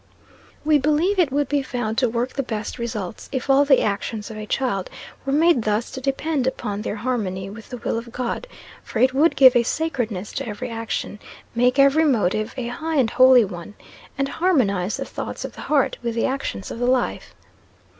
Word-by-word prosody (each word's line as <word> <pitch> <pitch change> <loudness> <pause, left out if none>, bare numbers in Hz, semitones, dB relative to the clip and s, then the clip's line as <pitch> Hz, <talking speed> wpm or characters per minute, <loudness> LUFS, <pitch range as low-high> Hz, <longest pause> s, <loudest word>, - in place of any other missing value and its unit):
We 305 -1 +4
believe 310 +8 +2
it 325 -7 +3
would 285 0 +1
be 290 0 +1
found 240 -4 -3
to 250 -2 +2
work 235 +2 -2
the 275 - -1
best 220 -4 -5
results, 220 -5 -5
if 260 +1 -1
all 280 +1 +5
the 275 -2 +4
actions 210 +1 -3
of 215 - -8
a 215 0 -6
child 205 -8 -1 0.4
were - - +1
made 315 -2 +4
thus 215 +1 -1
to 260 - -6
depend 275 0 -1
upon 210 -5 -3
their 210 - -3
harmony 205 -5 -3
with 220 +1 -11
the 250 - -6
will 230 - -2
of 235 0 -11
God; 250 - -3 0.4
for - - -6
it 255 +3 +4
would 305 +5 +3
give 260 -2 +7
a 240 - +6
sacredness 235 - -2
to - - -4
every 230 +3 -5
action, 225 -2 -4 0.3
make 250 +2 +2
every 275 +3 +5
motive 215 -4 +1
a 250 - -3
high 315 +6 -3
and 255 -6 +2
holy 255 -2 +7
one, 185 +1 -9 0.4
and 275 0 0
harmonise 220 - +1
the - - -4
thoughts - - -6
of - - -7
the - - -10
heart 290 -3 +1
with 235 -2 -3
the 230 - +1
actions 180 - -3
of - - -6
the 245 - 0
life. 255 -1 0
245 Hz, 205 wpm, -22 LUFS, 215-275 Hz, 0.4 s, give